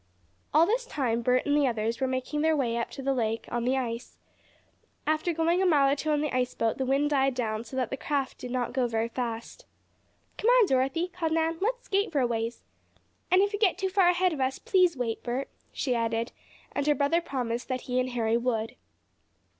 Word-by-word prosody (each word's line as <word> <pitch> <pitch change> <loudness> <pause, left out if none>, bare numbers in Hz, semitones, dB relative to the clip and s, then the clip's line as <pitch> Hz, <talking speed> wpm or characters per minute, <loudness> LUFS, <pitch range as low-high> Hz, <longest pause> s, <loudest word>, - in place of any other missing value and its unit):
All 315 +2 +6
this 480 +6 0
time 240 - -1
Bert 250 +2 +2
and 290 - +2
the 290 -2 +3
others 230 0 -2
were 265 - +2
making 260 +3 -2
their 315 0 +3
way 240 -4 0
up 235 0 -2
the 275 0 -2
lake 225 -3 -1
on 240 0 -1
the 260 +2 +2
ice. 235 -2 -4 0.9
After 310 +3 +1
going 335 +2 +1
a - - +3
mile 280 -5 +4
or - - +2
two 310 +2 -3
on 295 -1 +2
the 300 -4 -2
ice 250 -1 0
boat 225 +2 0
the 265 - -1
wind 280 +3 +2
died 270 -2 +2
down 220 -3 -2
so 240 - -10
that 255 -3 -1
the 270 - -2
craft 280 -1 -2
did 250 - -6
not 245 -1 -2
go 255 -2 +1
very 225 0 -1
fast. 235 -2 -5 0.7
"Come 440 - 0
on, - - +6
Dorothy," 270 +4 +1
called 340 -3 -2
Nan, 325 0 0
"let's 485 +4 -1
skate 400 +1 0
for 295 - +1
a 255 - +3
ways. 230 0 -2 0.7
And 370 +2 +5
if 405 +1 -1
you 410 - -2
get 390 -5 +3
too 380 0 -1
far 375 -2 +4
ahead 360 0 +2
of 285 - -4
us, 260 +1 0
please 365 -5 +2
wait, 230 -3 -2
Bert," 255 +3 -3 0.2
she 255 - -1
added, 230 0 -1 0.4
and 285 0 -2
her 295 - +4
brother 290 +4 +2
promised 245 -6 -3
that 255 -1 -2
he 250 0 -1
and 255 0 0
Harry 230 -2 +1
would. 235 -1 -1
265 Hz, 225 wpm, -28 LUFS, 240-320 Hz, 0.9 s, All